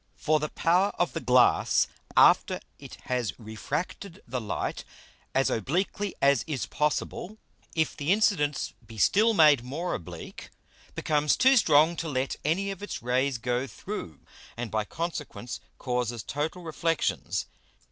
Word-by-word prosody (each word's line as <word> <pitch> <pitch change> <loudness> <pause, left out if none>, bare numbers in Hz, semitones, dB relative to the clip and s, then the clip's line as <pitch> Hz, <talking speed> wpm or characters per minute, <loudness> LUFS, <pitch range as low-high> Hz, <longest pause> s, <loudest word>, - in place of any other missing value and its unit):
For 155 0 +1
the 150 0 -2
power 180 +4 +2
of 175 - 0
the 165 - -2
Glass 125 -3 +4 0.3
after - - +5 0.2
it - - -10
has 125 -3 -2
refracted 150 - -5
the 125 -2 -3
Light 105 - -3 0.5
as 135 0 +3
obliquely 185 - -1
as 140 -3 +5
is 135 - -2
possible, 150 - -2 0.4
if 160 -2 +1
the 150 +3 -1
Incidence 185 -9 +1
be 110 0 -12
still 215 - +4
made 150 -7 +6
more 155 +8 -3
oblique, 85 -1 -8 0.5
becomes 150 -1 +1
too 265 +1 +6
strong 160 - +5
to 160 +1 -3
let 130 -1 -1
any 190 +7 0
of 195 0 -8
its 205 - -6
Rays 130 +2 +1
go 125 +2 -1
through, 130 - -7 0.4
and 120 -2 -4
by 110 -1 0
consequence 150 -5 -5 0.2
causes 125 -3 -2
total 155 +5 -3
Reflexions. 165 0 -1
150 Hz, 140 wpm, -27 LUFS, 125-170 Hz, 0.5 s, made